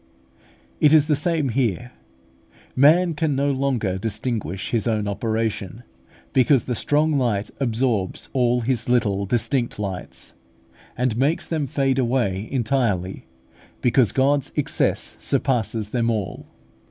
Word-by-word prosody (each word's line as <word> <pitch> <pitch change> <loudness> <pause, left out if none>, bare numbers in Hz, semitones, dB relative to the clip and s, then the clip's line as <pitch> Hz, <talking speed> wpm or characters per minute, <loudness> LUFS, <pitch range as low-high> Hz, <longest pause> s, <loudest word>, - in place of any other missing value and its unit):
It 150 0 +5
is 155 -2 +6
the 150 - +2
same 155 -1 0
here; 120 -1 -1 0.8
man 165 +6 +5
can 155 -2 -1
no 140 +1 +1
longer 130 -9 -1
distinguish 105 - -3
his 115 -1 0
own 110 -2 0
operation, 110 +1 -3 0.5
because 130 0 +3
the 125 - -2
strong 150 +4 +1
light 105 -5 -1
absorbs 115 -6 -1
all 125 -1 +2
his 120 -1 -1
little 100 -5 +1
distinct 120 +3 0
lights, 95 -3 -6 0.6
and 125 -2 0
makes 145 +6 +1
them 155 -4 -2
fade 135 0 0
away 115 -6 0
entirely, 115 -8 -1 0.5
because 125 -2 +3
God's 140 +1 +1
excess - - 0
surpasses 110 -4 -1
them 120 -2 0
all. 105 -5 -3
120 Hz, 125 wpm, -22 LUFS, 110-135 Hz, 0.8 s, is